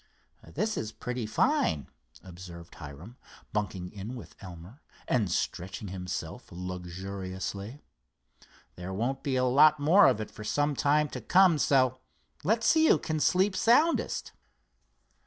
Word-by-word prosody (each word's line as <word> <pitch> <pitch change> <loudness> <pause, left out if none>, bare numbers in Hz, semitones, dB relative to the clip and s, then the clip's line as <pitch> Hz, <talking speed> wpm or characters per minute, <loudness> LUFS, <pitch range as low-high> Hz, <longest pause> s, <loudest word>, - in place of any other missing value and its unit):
"This 215 0 -1
is 110 0 -3
pretty 125 -1 -5
fine," 75 -7 +1 0.4
observed 85 -2 -11
Hiram, 80 - -11 0.4
bunking 95 -4 -3
in 105 +5 -7
with 120 - -11
Elmer 90 - -11 0.3
and 110 -7 +1
stretching 95 +5 -3
himself 90 +3 -6
luxuriously. 95 +5 -6 0.9
"There 90 +1 -6
won't 125 +6 -2
be 135 -2 -1
a 130 - +2
lot 150 +4 +5
more 165 +8 +6
of - - +2
it 110 - -6
for 105 - -10
some 145 +6 0
time 150 +2 +2
to - - -7
come, 185 -4 +4
so 130 -3 +2 0.4
let's 220 +7 +1
see 320 -1 +5
who - - +5
can 155 -1 -3
sleep 190 +5 +2
soundest." 295 - +2
110 Hz, 135 wpm, -29 LUFS, 95-145 Hz, 0.9 s, more